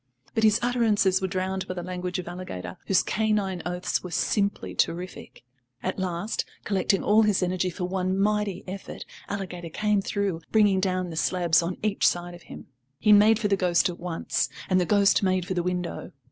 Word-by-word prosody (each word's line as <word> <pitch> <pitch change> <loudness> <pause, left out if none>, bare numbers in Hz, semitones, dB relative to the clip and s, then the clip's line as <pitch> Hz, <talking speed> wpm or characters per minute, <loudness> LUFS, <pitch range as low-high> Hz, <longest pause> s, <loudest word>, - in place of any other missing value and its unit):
But 225 - 0
his 215 0 +5
utterances 215 -6 +2
were 190 - 0
drowned 190 0 -2
by 185 - -4
the 175 - -4
language 180 0 -4
of 180 - -5
Alligator, 95 - -6
whose 190 -2 +3
canine 205 -4 0
oaths 180 0 -2
were 180 - -6
simply 200 +4 0
terrific. 180 -4 -3 0.4
At 185 +1 -2
last, 185 +3 -2 0.2
collecting 195 -1 +1
all 215 +2 +5
his 210 -3 +2
energy 180 0 0
for 180 +1 -4
one 185 +1 -1
mighty 205 -2 0
effort, 190 +1 -7 0.2
Alligator 180 -4 -5
came 210 +4 +1
through, 195 -4 -2
bringing 205 -3 +4
down 185 -2 -1
the - - -6
slabs 170 0 +2
on 170 +2 -3
each 210 -2 +2
side 175 0 -1
of 175 - -12
him. - - -9 0.3
He 210 +5 +5
made 210 +2 +6
for 220 -2 0
the 200 - +3
ghost 180 -2 +2
at 175 - -7
once, 170 -2 -1 0.2
and 185 0 +4
the 175 - -1
ghost 200 -1 +4
made 185 -2 +1
for 185 - -3
the 175 - 0
window. 180 -1 -3
185 Hz, 190 wpm, -26 LUFS, 180-205 Hz, 0.4 s, made